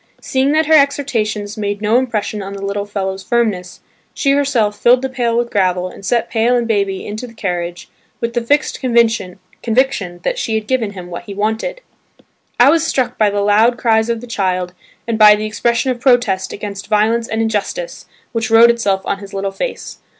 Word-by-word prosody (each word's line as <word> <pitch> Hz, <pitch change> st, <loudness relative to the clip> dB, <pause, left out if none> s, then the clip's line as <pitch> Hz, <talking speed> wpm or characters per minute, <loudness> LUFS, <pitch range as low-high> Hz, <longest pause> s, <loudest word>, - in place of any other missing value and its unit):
Seeing 265 Hz, +1 st, 0 dB
that 315 Hz, +1 st, +3 dB
her 320 Hz, -, +2 dB
exhortations 230 Hz, -8 st, +1 dB
made 205 Hz, -1 st, -2 dB
no 215 Hz, +3 st, +2 dB
impression 215 Hz, -4 st, -2 dB
on 195 Hz, 0 st, -6 dB
the 200 Hz, 0 st, -6 dB
little 200 Hz, +1 st, -3 dB
fellow's 195 Hz, -2 st, -3 dB
firmness, 210 Hz, -6 st, -1 dB, 0.3 s
she 275 Hz, -, +1 dB
herself 270 Hz, -7 st, +1 dB
filled 250 Hz, +2 st, +4 dB
the 265 Hz, -, -1 dB
pail 240 Hz, -3 st, -1 dB
with 240 Hz, 0 st, -1 dB
gravel 185 Hz, -2 st, +1 dB
and 195 Hz, -, -13 dB
set 235 Hz, +4 st, 0 dB
pail 235 Hz, +2 st, +1 dB
and 240 Hz, -1 st, 0 dB
baby 200 Hz, -3 st, -1 dB
into 215 Hz, +4 st, -6 dB
the 230 Hz, -, -15 dB
carriage 175 Hz, -4 st, -4 dB, 0.3 s
with 235 Hz, 0 st, -3 dB
the 240 Hz, -, 0 dB
fixed 290 Hz, +6 st, 0 dB
conviction 230 Hz, -7 st, +1 dB, 0.9 s
that -, -, -1 dB
she 225 Hz, -, -1 dB
had 220 Hz, -1 st, -2 dB
given 225 Hz, -4 st, -1 dB
him 180 Hz, -2 st, -9 dB
what 175 Hz, 0 st, -7 dB
he 200 Hz, -, -8 dB
wanted. 220 Hz, -, -2 dB, 0.8 s
I 255 Hz, +4 st, +7 dB
was 330 Hz, 0 st, +3 dB
struck 265 Hz, -5 st, -1 dB
by 215 Hz, -1 st, +4 dB
the 205 Hz, 0 st, -1 dB
loud 215 Hz, +4 st, +3 dB
cries 220 Hz, -2 st, +2 dB
of 230 Hz, -1 st, -1 dB
the -, -, -8 dB
child 185 Hz, -5 st, -2 dB, 0.3 s
and 230 Hz, -1 st, -1 dB
by 210 Hz, -1 st, +8 dB
the 210 Hz, +1 st, -4 dB
expression 235 Hz, +4 st, 0 dB
of 240 Hz, -1 st, -5 dB
protest 240 Hz, -7 st, +2 dB
against 200 Hz, -1 st, -7 dB
violence 225 Hz, +2 st, +1 dB
and 220 Hz, -, -3 dB
injustice 225 Hz, -, -3 dB, 0.2 s
which 225 Hz, -1 st, -2 dB
wrote 230 Hz, +1 st, +7 dB
itself 200 Hz, -5 st, 0 dB
on 195 Hz, -, -2 dB
his 200 Hz, -1 st, -10 dB
little 195 Hz, 0 st, -2 dB
face. -, -, -5 dB
220 Hz, 195 wpm, -17 LUFS, 200-240 Hz, 0.9 s, by